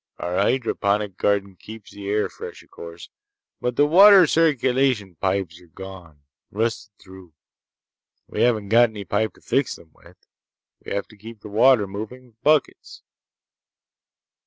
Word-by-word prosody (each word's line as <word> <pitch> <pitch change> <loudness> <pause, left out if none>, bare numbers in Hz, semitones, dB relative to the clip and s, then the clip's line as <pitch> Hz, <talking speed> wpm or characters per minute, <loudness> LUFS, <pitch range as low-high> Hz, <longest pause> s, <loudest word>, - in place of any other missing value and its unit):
Our 90 +1 -4
hydroponic 105 -3 0
garden 100 -2 -1
keeps 110 +2 -12
the 100 -1 -8
air 105 +1 0
fresh, - - -10
o'course. 85 0 -12 0.5
But 125 0 -3
the 145 - +4
water 190 +4 +7
circulation 130 - +1
pipes 95 -1 -2
are 90 - -19
gone. 85 -4 -12 0.3
Rusted 110 0 -3
through. 95 -3 -15 0.9
We - - -5
haven't 110 -4 +1
got 120 +2 +5
any 105 -2 -8
pipe 105 -1 -1
to - - -22
fix - - -1
them - - -18
with. - - -20 0.7
We - - -9
have 100 0 -3
to 110 - -17
keep 110 +1 -12
the 105 - -10
water 115 +1 +4
moving 110 +6 -8
with 115 -2 -27
buckets." 155 0 0
105 Hz, 145 wpm, -22 LUFS, 95-125 Hz, 0.9 s, water